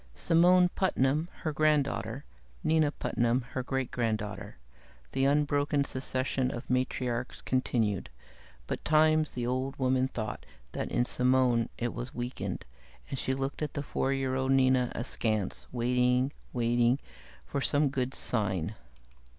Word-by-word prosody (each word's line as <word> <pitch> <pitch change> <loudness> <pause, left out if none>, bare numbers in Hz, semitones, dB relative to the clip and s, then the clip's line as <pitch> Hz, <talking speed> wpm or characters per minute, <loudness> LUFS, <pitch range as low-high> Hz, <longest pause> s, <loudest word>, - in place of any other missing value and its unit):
Simone 180 +2 +5
Putnam, 155 -3 +1
her 155 - -1
granddaughter; 145 -4 +1 0.4
Nina 155 -2 +3
Putnam, 120 -2 0
her 130 - -2
great 135 0 -2
granddaughter; 110 -3 -3 0.5
the 135 - +1
unbroken 145 0 +2
succession 130 -1 -1
of 120 -2 -6
matriarchs 125 -1 -1
continued, 115 -6 0 0.6
but - - -4
times 155 0 +4
the 120 -1 -4
old 130 +2 -1
woman 130 0 +2
thought 110 -4 -5 0.3
that - - -3
in 120 - +2
Simone 125 -2 +2
it 120 0 -2
was 125 +4 -6
weakened, 125 +1 -4 0.5
and 135 - -3
she 130 - -1
looked 135 +2 -3
at 150 -2 -3
the 145 - -2
four 135 -1 -1
year 135 -1 0
old 130 0 +1
Nina 130 -2 +3
askance, 110 -4 -2
waiting, 125 +2 +2 0.2
waiting, 120 +1 +2 0.5
for 140 - -3
some 145 +1 +2
good 130 -1 -2
sign. 100 -5 0
130 Hz, 135 wpm, -30 LUFS, 120-140 Hz, 0.6 s, Simone